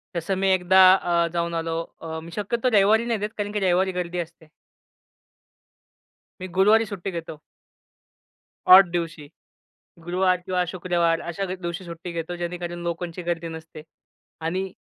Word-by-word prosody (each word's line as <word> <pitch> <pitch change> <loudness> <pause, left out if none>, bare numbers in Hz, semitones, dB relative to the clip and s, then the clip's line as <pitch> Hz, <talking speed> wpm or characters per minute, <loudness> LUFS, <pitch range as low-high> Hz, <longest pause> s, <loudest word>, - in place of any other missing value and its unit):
जसं 170 +3 -1
मी 195 +1 0
एकदा 185 +1 +2 0.2
अ, 170 -2 +1
जाऊन 170 0 -1
आलो. 165 0 -2 0.3
अ, 160 0 -5
मी 170 - -11
शक्यतो 235 +4 0
रविवारी 215 +4 +4
नाही 230 -3 -1
देत 210 +2 -4
कारण 205 0 -3
की 210 - 0
रविवारी 190 0 +2
गर्दी 175 0 -5
असते. 165 -1 -8 1.9
मी 185 - -4
गुरुवारी 215 +4 +5
सुट्टी 195 0 -5
घेतो. 160 -2 -8 1.3
ऑड 185 0 +9
दिवशी. 165 -4 -4 0.7
गुरुवार 180 +1 +1
किंवा 180 0 -1
शुक्रवार 175 -2 0
अशा 170 +3 -4
द 185 - -6
दिवशी 170 +2 -4
सुट्टी 170 +1 -8
घेतो 170 +1 -4
जेणेकरून 175 0 -5
लोकांची 170 +1 -4
गर्दी 170 -1 -2
नसते 160 -1 -9 0.6
आणि 185 +3 -2
175 Hz, 145 wpm, -24 LUFS, 170-190 Hz, 1.9 s, ऑड